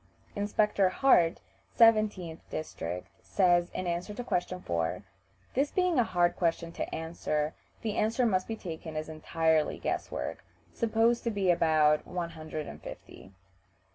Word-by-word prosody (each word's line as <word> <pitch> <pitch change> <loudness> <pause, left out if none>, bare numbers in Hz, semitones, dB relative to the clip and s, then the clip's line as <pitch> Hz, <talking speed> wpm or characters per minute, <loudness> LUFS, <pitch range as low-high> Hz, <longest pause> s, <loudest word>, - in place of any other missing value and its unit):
Inspector 205 -1 +2
Hartt, 185 -7 +4 0.4
17th 215 -7 +4
district, 90 - -5
says, 175 -2 +3
in 185 - -4
answer 175 +4 -3
to 245 - -4
question 180 -4 -1
4, 85 - -2 0.5
"This 280 +3 +1
being 360 -5 +2
a - - +5
hard 175 -4 +2
question 170 -1 0
to - - -4
answer, 160 -2 -2 0.3
the 220 -2 -2
answer 225 +4 +2
must 185 -5 +1
be 225 - -3
taken 165 -5 -7
as 155 +1 -3
entirely 160 0 +1
guess - - -2
work: - - -5 0.3
supposed 230 +1 +2
to - - +2
be 200 -4 +2
about 155 -3 +3
one 175 -2 -3
hundred 155 -2 -6
and - - -9
fifty." 95 - -11
175 Hz, 145 wpm, -30 LUFS, 160-215 Hz, 0.5 s, a